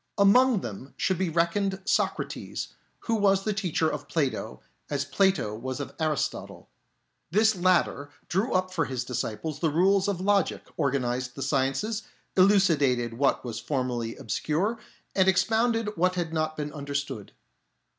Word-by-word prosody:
Among 215 Hz, +2 st, +5 dB
them 120 Hz, +5 st, -8 dB
should 190 Hz, -3 st, 0 dB
be 190 Hz, -2 st, +1 dB
reckoned 180 Hz, +4 st, +1 dB
Socrates, -, -, -1 dB, 0.3 s
who 230 Hz, -, -2 dB
was 195 Hz, -3 st, +3 dB
the 215 Hz, -, 0 dB
teacher 180 Hz, -5 st, 0 dB
of -, -, -4 dB
Plato 145 Hz, -6 st, -2 dB, 0.3 s
as 140 Hz, -1 st, -1 dB
Plato 170 Hz, -, +1 dB
was 130 Hz, +4 st, -5 dB
of 140 Hz, -, -5 dB
Aristotle. 155 Hz, -3 st, -2 dB, 0.6 s
This 215 Hz, +5 st, +3 dB
latter 175 Hz, -5 st, +2 dB, 0.2 s
drew 195 Hz, +8 st, 0 dB
up 185 Hz, 0 st, 0 dB
for 165 Hz, -4 st, +1 dB
his 130 Hz, -3 st, -3 dB
disciples 125 Hz, +4 st, -3 dB
the 165 Hz, -, +2 dB
rules 190 Hz, +5 st, +3 dB
of 200 Hz, -3 st, -1 dB
logic, 200 Hz, -1 st, +1 dB, 0.2 s
organised 125 Hz, -3 st, -1 dB
the 135 Hz, -, -4 dB
sciences, 140 Hz, -, 0 dB, 0.3 s
elucidated 155 Hz, -, +4 dB
what 140 Hz, -2 st, +2 dB
was 120 Hz, -2 st, -4 dB
formerly 125 Hz, -5 st, -2 dB
obscure, 160 Hz, -, -1 dB, 0.4 s
and 190 Hz, -1 st, +4 dB
expounded 220 Hz, +3 st, +2 dB
what 185 Hz, +2 st, +2 dB
had 170 Hz, -2 st, -2 dB
not 155 Hz, -1 st, -1 dB
been 150 Hz, -1 st, -4 dB
understood. 140 Hz, -6 st, -4 dB
165 Hz, 145 wpm, -27 LUFS, 135-195 Hz, 0.6 s, Among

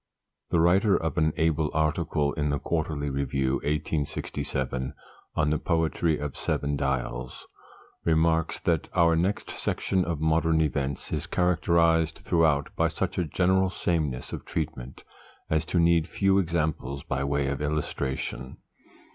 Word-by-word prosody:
_ -, -, -55 dB
The 85 Hz, -, +2 dB
writer 95 Hz, +5 st, +4 dB
of 80 Hz, -3 st, -2 dB
an 80 Hz, 0 st, +3 dB
able 80 Hz, -1 st, +1 dB
article 80 Hz, -1 st, +1 dB
in 75 Hz, -1 st, -1 dB
the 70 Hz, -, +1 dB
Quarterly 75 Hz, -3 st, -2 dB
Review, 70 Hz, -1 st, 0 dB
1867, 70 Hz, -3 st, -2 dB, 0.4 s
on 75 Hz, -, +2 dB
"The 75 Hz, -, +1 dB
Poetry 80 Hz, -1 st, +1 dB
of 75 Hz, -2 st, -5 dB
Seven 70 Hz, 0 st, -1 dB
Dials," 65 Hz, -3 st, -3 dB, 0.6 s
remarks 80 Hz, 0 st, +2 dB
that -, -, 0 dB
'Our 85 Hz, -1 st, +4 dB
next 90 Hz, +5 st, -1 dB
section 95 Hz, -1 st, 0 dB
of 85 Hz, -3 st, -2 dB
'Modern 80 Hz, +1 st, +2 dB
Events' 70 Hz, -3 st, -1 dB
is -, -, -2 dB
characterised 85 Hz, -2 st, +2 dB
throughout 80 Hz, -4 st, +1 dB
by -, -, +2 dB
such -, -, -2 dB
a 90 Hz, -, +1 dB
general 95 Hz, +4 st, +2 dB
sameness 80 Hz, -9 st, -2 dB
of -, -, -5 dB
treatment 70 Hz, -5 st, -5 dB, 0.5 s
as 80 Hz, 0 st, +2 dB
to 90 Hz, -, -1 dB
need 85 Hz, -1 st, +4 dB
few 95 Hz, -1 st, +2 dB
examples 80 Hz, -6 st, -1 dB
by 65 Hz, +1 st, -2 dB
way 70 Hz, 0 st, 0 dB
of 70 Hz, +1 st, -2 dB
illustration. 70 Hz, -3 st, -3 dB
80 Hz, 140 wpm, -27 LUFS, 70-85 Hz, 0.6 s, writer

